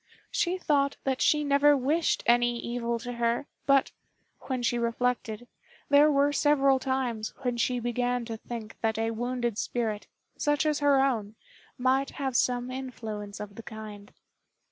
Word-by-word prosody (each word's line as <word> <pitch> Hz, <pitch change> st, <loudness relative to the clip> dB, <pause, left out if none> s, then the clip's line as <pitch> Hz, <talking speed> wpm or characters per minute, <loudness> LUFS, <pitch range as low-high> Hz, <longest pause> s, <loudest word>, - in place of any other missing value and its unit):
She 355 Hz, +1 st, 0 dB
thought 280 Hz, -5 st, +1 dB
that 265 Hz, -1 st, -1 dB
she 300 Hz, -1 st, +3 dB
never 285 Hz, 0 st, +4 dB
wished 300 Hz, +5 st, +1 dB
any 240 Hz, 0 st, +3 dB
evil 235 Hz, 0 st, -2 dB
to 245 Hz, +1 st, -6 dB
her; 235 Hz, +2 st, 0 dB, 0.2 s
but, 275 Hz, -1 st, +4 dB, 0.6 s
when 255 Hz, -2 st, -2 dB
she 240 Hz, 0 st, +1 dB
reflected, 235 Hz, -1 st, -1 dB, 0.4 s
there 285 Hz, +1 st, +6 dB
were 285 Hz, 0 st, +3 dB
several 275 Hz, -2 st, +3 dB
times 255 Hz, -5 st, -2 dB
when 245 Hz, -1 st, 0 dB
she 245 Hz, +1 st, +1 dB
began 245 Hz, 0 st, -1 dB
to 225 Hz, -1 st, -5 dB
think 225 Hz, -1 st, -8 dB
that 220 Hz, -1 st, 0 dB
a 225 Hz, 0 st, 0 dB
wounded 240 Hz, -1 st, -2 dB
spirit, 220 Hz, -4 st, -2 dB, 0.3 s
such 295 Hz, +1 st, +1 dB
as 300 Hz, -1 st, +1 dB
her 285 Hz, -2 st, +4 dB
own, 220 Hz, -6 st, -1 dB, 0.4 s
might 260 Hz, +2 st, +2 dB
have 270 Hz, -3 st, -2 dB
some 245 Hz, 0 st, +1 dB
influence 220 Hz, -6 st, -6 dB
of 210 Hz, -1 st, -7 dB
the 230 Hz, -, -9 dB
kind. 215 Hz, -2 st, -9 dB
245 Hz, 155 wpm, -28 LUFS, 230-275 Hz, 0.6 s, there